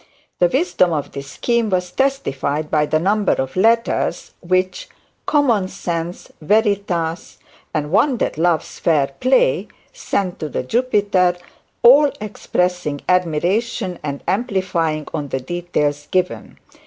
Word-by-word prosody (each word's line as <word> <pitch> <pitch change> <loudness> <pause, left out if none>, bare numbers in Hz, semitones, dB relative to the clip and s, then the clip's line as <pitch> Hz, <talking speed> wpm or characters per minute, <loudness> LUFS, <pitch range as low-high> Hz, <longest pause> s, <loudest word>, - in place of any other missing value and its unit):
The 175 - +5
wisdom 185 - +1
of 145 -2 -3
this 140 0 -7
scheme 235 - 0
was 180 -2 -1
testified 155 - -1
by 150 -1 +2
the 155 - +2
number 200 +4 +2
of 130 0 -3
letters 230 +5 +1
which 185 +1 -1 0.4
"Common 240 -10 +2
Sense", 170 -1 -5
"Veritas", 190 -3 0 0.3
and 150 -1 -2
"One 260 +6 +3
that - - -1
loves 165 0 0
fair 145 -5 +2
play," - - +2 0.3
sent 185 -3 -2
to 155 - -4
the - - -3
Jupiter, 200 - +1 0.5
all 280 +4 +7
expressing 180 -7 -2
admiration 180 +4 0
and 140 -2 -5
amplifying 180 -7 -1
on 150 -3 -3
the 135 - -2
details 145 -1 -2
given. 145 - -2
180 Hz, 125 wpm, -19 LUFS, 155-215 Hz, 0.5 s, all